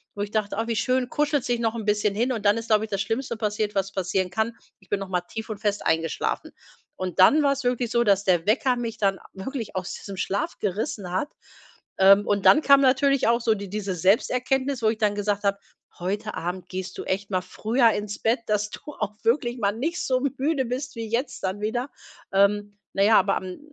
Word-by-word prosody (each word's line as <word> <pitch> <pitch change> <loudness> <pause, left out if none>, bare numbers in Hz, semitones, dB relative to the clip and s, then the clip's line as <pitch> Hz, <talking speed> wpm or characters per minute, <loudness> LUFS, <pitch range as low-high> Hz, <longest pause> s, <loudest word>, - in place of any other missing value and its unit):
wo 205 - -4
ich 205 0 -3
dachte: 210 -2 -1
„Ach 225 +1 -1
wie 230 -2 -1
schön, 255 +3 +1
kuschelst 295 -4 0
dich 240 -1 +1
noch 225 -1 0
'n 225 - -4
bisschen 210 -1 +1
hin“ 240 +5 +1
und 220 -4 -3
dann 205 0 +5
ist, 230 0 -5
glaube 215 0 +3
ich, - - -14
das 200 -1 -1
Schlimmste 235 +4 -2
passiert, 210 -1 -2
was 195 0 0
passieren 190 -1 -1
kann. 220 +6 -1 0.3
Ich 190 - -24
bin 200 +1 -1
noch 195 - -6
mal 180 -1 0
tief 220 +6 -8
und 215 -2 -5
fest 205 -1 -1
eingeschlafen. 160 0 -1 0.4
Und 185 -2 -5
dann 295 +11 +7
war's 275 -2 +1
wirklich 245 -1 0
so, 235 0 +2
dass 200 -1 +3
der 180 -4 +2
Wecker 250 +3 +2
mich 230 -2 -4
dann 195 -2 +1
wirklich 225 +2 -6
aus 185 -1 -3
diesem 200 - -8
Schlaf 195 +2 -2
gerissen 205 -1 -3
hat. 185 +10 -1 0.7
Ähm, 195 +2 +6
und 200 -1 0
dann 305 - +7
kam 280 -2 +6
natürlich 275 0 +3
auch 235 +1 +3
so 225 -2 +2
die 200 -1 -7
diese 200 -1 -3
Selbsterkenntnis, 250 - +1
wo 220 - +2
ich 220 - -1
dann 210 -2 +1
gesagt 205 0 -1
habe: 200 0 +1 0.4
„Heute 205 +4 -3
Abend 180 +2 -4
gehst 185 0 -5
du - - -4
echt 195 +2 -2
mal 185 - +2
früher 230 +5 +2
ins 210 -1 -4
Bett, 230 +2 +1
dass 210 0 0
du - - -9 0.2
auch 210 -1 -3
wirklich 240 +1 +1
mal 200 -2 +2
nicht 320 - -2
so 255 -1 +1 0.2
müde 275 0 0
bist 260 +3 -4
wie 225 -1 -5
jetzt 245 +4 -2
dann 190 +2 -2
wieder.“ 240 +5 -2 0.4
Ähm, 205 +1 +2 0.2
na 195 - +2
ja, 215 +2 +6
aber 195 -1 +1
am 185 -1 -7
210 Hz, 225 wpm, -25 LUFS, 195-240 Hz, 0.7 s, dann